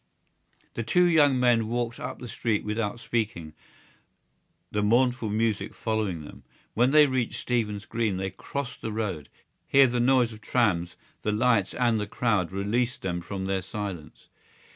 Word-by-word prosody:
The -, -, -3 dB
two 145 Hz, +11 st, +3 dB
young 150 Hz, -6 st, +4 dB
men 120 Hz, -3 st, +3 dB
walked 120 Hz, 0 st, -2 dB
up -, -, -5 dB
the 125 Hz, -, -8 dB
street 115 Hz, -2 st, -1 dB
without 105 Hz, +1 st, -2 dB
speaking, 110 Hz, -10 st, -3 dB, 1.2 s
the 105 Hz, -, 0 dB
mournful 120 Hz, +2 st, +2 dB
music 105 Hz, -1 st, -1 dB
following 105 Hz, -8 st, -2 dB
them. -, -, -12 dB, 0.3 s
When 120 Hz, +3 st, +3 dB
they 150 Hz, +1 st, +7 dB
reached 130 Hz, -4 st, -1 dB
Stephen's 105 Hz, -4 st, -1 dB
Green 110 Hz, -4 st, -1 dB
they 95 Hz, 0 st, -3 dB
crossed 125 Hz, +7 st, -6 dB
the 110 Hz, -, -4 dB
road. 100 Hz, -9 st, -3 dB, 0.4 s
Here 140 Hz, 0 st, +6 dB
the 120 Hz, -1 st, 0 dB
noise 125 Hz, -1 st, +3 dB
of 110 Hz, -, -13 dB
trams, 95 Hz, -10 st, +1 dB, 0.3 s
the 105 Hz, -, 0 dB
lights 110 Hz, -2 st, +2 dB
and 120 Hz, -3 st, +2 dB
the 105 Hz, -, -3 dB
crowd 105 Hz, -6 st, 0 dB
released 115 Hz, +6 st, -1 dB
them 90 Hz, -2 st, -2 dB
from 95 Hz, +2 st, -5 dB
their 95 Hz, 0 st, -1 dB
silence. 95 Hz, -5 st, -7 dB
110 Hz, 160 wpm, -27 LUFS, 100-120 Hz, 1.2 s, they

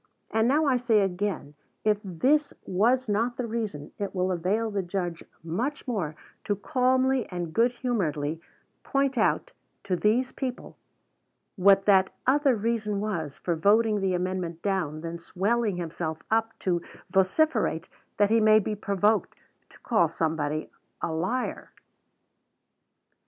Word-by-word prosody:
And 220 Hz, +1 st, +2 dB
now 300 Hz, +5 st, +3 dB
I 265 Hz, -3 st, +3 dB
say 235 Hz, -4 st, +3 dB
again, 190 Hz, -6 st, -2 dB, 0.3 s
if 210 Hz, -1 st, +2 dB
this 260 Hz, -, +1 dB
was 235 Hz, +7 st, +2 dB
not 230 Hz, +4 st, 0 dB
the 250 Hz, -, -2 dB
reason, 215 Hz, -11 st, -4 dB
it 200 Hz, -1 st, -3 dB
will 185 Hz, 0 st, +1 dB
avail 200 Hz, +6 st, 0 dB
the 200 Hz, -1 st, 0 dB
judge 175 Hz, -2 st, -3 dB, 0.2 s
much 240 Hz, -, -3 dB
more 180 Hz, -11 st, -2 dB, 0.3 s
to 205 Hz, -, 0 dB
calmly 255 Hz, +4 st, +1 dB
and 175 Hz, -3 st, -4 dB
good 235 Hz, +2 st, +3 dB
humoredly 165 Hz, -, -2 dB, 0.4 s
point 275 Hz, -1 st, 0 dB
out 250 Hz, -, +1 dB, 0.3 s
to 195 Hz, -2 st, 0 dB
these 230 Hz, +8 st, +1 dB
people 255 Hz, -2 st, -5 dB, 0.8 s
what 195 Hz, 0 st, +5 dB
that 190 Hz, -2 st, +4 dB
other 275 Hz, 0 st, +4 dB
reason 215 Hz, -2 st, -1 dB
was 170 Hz, -9 st, -3 dB
for 175 Hz, -, -1 dB
voting 210 Hz, +4 st, +3 dB
the 190 Hz, -1 st, +1 dB
amendment 180 Hz, -2 st, -3 dB
down 175 Hz, -7 st, -1 dB
than 170 Hz, +1 st, -5 dB
swelling 205 Hz, +5 st, 0 dB
himself 160 Hz, -2 st, -4 dB
up 225 Hz, 0 st, +1 dB
to 175 Hz, -2 st, 0 dB, 0.3 s
vociferate 190 Hz, -, +2 dB, 0.3 s
that 205 Hz, 0 st, +3 dB
he 225 Hz, -, +5 dB
may 215 Hz, 0 st, +6 dB
be 215 Hz, 0 st, 0 dB
provoked 205 Hz, +1 st, +1 dB, 0.3 s
to -, -, -19 dB
call 220 Hz, -8 st, +3 dB
somebody 155 Hz, -1 st, -2 dB, 0.3 s
a -, -, 0 dB
liar. 185 Hz, +11 st, -2 dB
205 Hz, 140 wpm, -27 LUFS, 175-235 Hz, 0.8 s, may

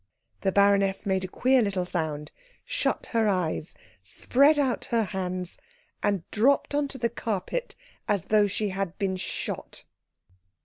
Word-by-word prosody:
The 195 Hz, -, +1 dB
baroness 200 Hz, 0 st, +3 dB
made 190 Hz, -1 st, +1 dB
a -, -, -2 dB
queer 255 Hz, +7 st, +3 dB
little 195 Hz, -4 st, 0 dB
sound, 155 Hz, -4 st, -3 dB, 0.3 s
shut -, -, -1 dB
her 225 Hz, -2 st, +2 dB
eyes, 180 Hz, -4 st, -1 dB, 0.3 s
spread 280 Hz, -, +3 dB
out 270 Hz, -4 st, +1 dB
her 230 Hz, -1 st, +1 dB
hands, 185 Hz, -2 st, -3 dB, 0.4 s
and 200 Hz, -4 st, +1 dB
dropped 270 Hz, +7 st, +3 dB
on 290 Hz, 0 st, +1 dB
to 275 Hz, -, -6 dB
the 235 Hz, -2 st, +1 dB
carpet 230 Hz, -, -3 dB, 0.3 s
as 200 Hz, -5 st, +1 dB
though 210 Hz, -1 st, +6 dB
she 205 Hz, +1 st, -1 dB
had 190 Hz, -2 st, -3 dB
been 195 Hz, -3 st, 0 dB
shot. 185 Hz, -, -5 dB
200 Hz, 145 wpm, -27 LUFS, 185-235 Hz, 0.4 s, though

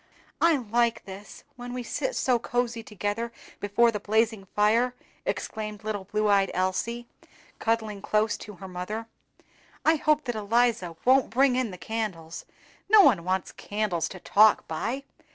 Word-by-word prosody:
"I 335 Hz, -1 st, +5 dB
like 235 Hz, -1 st, 0 dB, 0.5 s
when 245 Hz, 0 st, -7 dB
we 250 Hz, -, -4 dB
sit -, -, -3 dB
so 250 Hz, -2 st, +2 dB
cosy 240 Hz, 0 st, -1 dB
together 210 Hz, +2 st, -3 dB, 0.3 s
before 230 Hz, +4 st, +3 dB
the 210 Hz, -, -3 dB
blazing 215 Hz, -1 st, 0 dB
fire!" 230 Hz, +4 st, +3 dB, 0.3 s
exclaimed 215 Hz, -, -4 dB
little 210 Hz, -3 st, -3 dB
blue 210 Hz, +2 st, 0 dB
eyed 200 Hz, -1 st, +3 dB
Elsie, 190 Hz, +6 st, -1 dB, 0.5 s
cuddling 220 Hz, -3 st, -1 dB
close 215 Hz, +1 st, +1 dB
to 210 Hz, -, -10 dB
her 190 Hz, 0 st, -10 dB
mother. 185 Hz, +5 st, -5 dB, 0.8 s
"I 320 Hz, 0 st, +5 dB
hope 305 Hz, 0 st, +2 dB
that 245 Hz, -, -3 dB
Eliza 215 Hz, -4 st, +1 dB
won't 260 Hz, +1 st, +5 dB
bring 260 Hz, +1 st, +3 dB
in 255 Hz, -3 st, 0 dB
the 180 Hz, -, -8 dB
candles; 185 Hz, -7 st, -5 dB, 0.4 s
no 430 Hz, 0 st, +9 dB
one 210 Hz, -, +4 dB
wants 185 Hz, +1 st, -1 dB
candles 200 Hz, -7 st, -2 dB
to 185 Hz, -, -9 dB
talk 215 Hz, +4 st, +4 dB
by. 230 Hz, -, -3 dB
220 Hz, 150 wpm, -27 LUFS, 200-240 Hz, 0.8 s, no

